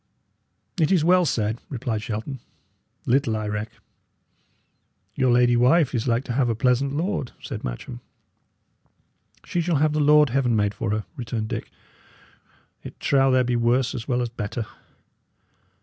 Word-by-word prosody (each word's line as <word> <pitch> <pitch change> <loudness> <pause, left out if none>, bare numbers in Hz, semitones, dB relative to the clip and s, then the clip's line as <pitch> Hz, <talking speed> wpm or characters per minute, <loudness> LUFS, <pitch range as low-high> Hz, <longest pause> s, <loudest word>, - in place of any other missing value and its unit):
"It 160 0 +2
is 180 -5 +3
well 180 +1 +5
said," 110 -2 -1
replied 120 -5 -3
Shelton. 115 +5 -5 0.7
"Little 125 -3 +1
I 110 -1 -3
reck." 105 +1 -4 1.4
"Your 130 -1 +2
lady 120 0 +4
wife 135 +4 +3
is 120 0 -1
like 120 +1 +1
to 125 - -4
have 125 -1 +1
a 115 - 0
pleasant 125 +4 +1
lord," 170 -6 -2
said - - -7
Matcham. - - -6 1.5
"She 175 - -1
shall 170 0 0
have 150 +1 +2
the 155 - 0
lord 150 0 +5
Heaven 125 -3 +1
made 105 -1 +1
her - - -26
for," 105 0 -1
returned 115 -4 -4
Dick. - - -4 1.1
"It - - -11
trow 135 -1 +3
there 130 -1 +4
be 125 0 0
worse 120 +3 +1
as 120 -5 -6
well 125 -1 0
as 120 - -3
better." 115 0 -4
125 Hz, 155 wpm, -24 LUFS, 115-140 Hz, 1.5 s, well